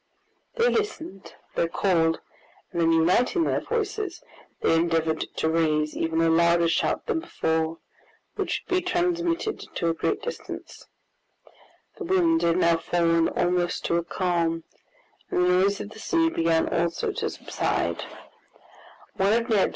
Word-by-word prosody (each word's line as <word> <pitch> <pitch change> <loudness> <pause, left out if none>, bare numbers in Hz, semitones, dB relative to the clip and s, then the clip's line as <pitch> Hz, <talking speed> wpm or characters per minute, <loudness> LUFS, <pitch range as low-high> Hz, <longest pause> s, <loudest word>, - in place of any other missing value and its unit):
They 475 0 +3
listened, 320 - -3 0.2
they 170 - +1
called, 165 -2 +1 0.5
and 170 - -1
then 165 0 +4
uniting 180 - +3
their - - 0
voices, 420 -5 -3 0.4
they - - +3
endeavored 165 -1 +1 0.2
to - - 0
raise 155 -2 +1
even 165 0 0
a 165 - +3
louder 170 +1 +4
shout - - 0
than - - 0
before, 160 - -1 0.6
which - - -2
would 370 - +1
be - - +1
transmitted 350 +2 0 0.2
to 170 - 0
a - - +1
great 415 - -2
distance. 485 - -7 1.1
The 395 - -4
wind 335 -3 +3
had 170 +1 +2
now 170 -2 +3
fallen 165 0 +2
almost 175 0 0
to 170 - +1
a 170 - 0
calm, 170 -2 -1 0.7
and 180 - +2
the - - +2
noise 190 +3 +3
of 205 - -7
the 220 - -12
sea 330 +5 +1
began 165 - +2
also 170 - 0
to - - -2
subside. - - -2
175 Hz, 140 wpm, -25 LUFS, -, 1.1 s, then